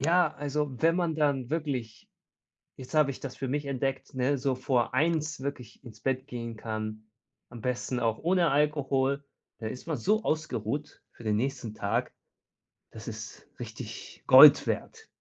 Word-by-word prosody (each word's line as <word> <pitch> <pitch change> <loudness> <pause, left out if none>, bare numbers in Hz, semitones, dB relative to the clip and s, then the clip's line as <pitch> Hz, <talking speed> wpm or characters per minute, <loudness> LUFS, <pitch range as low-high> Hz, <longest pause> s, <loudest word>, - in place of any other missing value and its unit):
ja, 170 +5 +3
also, 145 0 -2
wenn 165 +2 +4
man 170 -3 0
dann 140 -5 0
wirklich 135 -9 -3 0.7
jetzt 130 +4 -10
habe 150 -2 +4
ich - - -11
das 135 -3 -6
für 135 - -3
mich 145 +1 -2
entdeckt, 135 0 -2
ne, 130 +2 +1
so 135 0 0
vor 130 -2 0
1:00 155 +1 +1
wirklich 130 -3 -6
ins 110 -3 -12
Bett 130 0 -1
gehen 115 -3 -6
kann, 110 -1 -5 0.5
am 120 -1 -9
besten 125 +1 -2
auch 115 -1 +1
ohne 175 -1 +2
Alkohol, 140 -1 +1 0.3
da 110 - -4
ist 125 +6 -8
man 160 -3 -1
so 215 - +1
ausgeruht 150 -2 -2
für - - -15
den 105 -1 +1
nächsten 125 -3 -2
Tag. - - -1 0.8
Das - - -9
ist - - -8
richtig - - -8
Gold - - +10
wert. - - -4
135 Hz, 160 wpm, -29 LUFS, 120-150 Hz, 0.8 s, Gold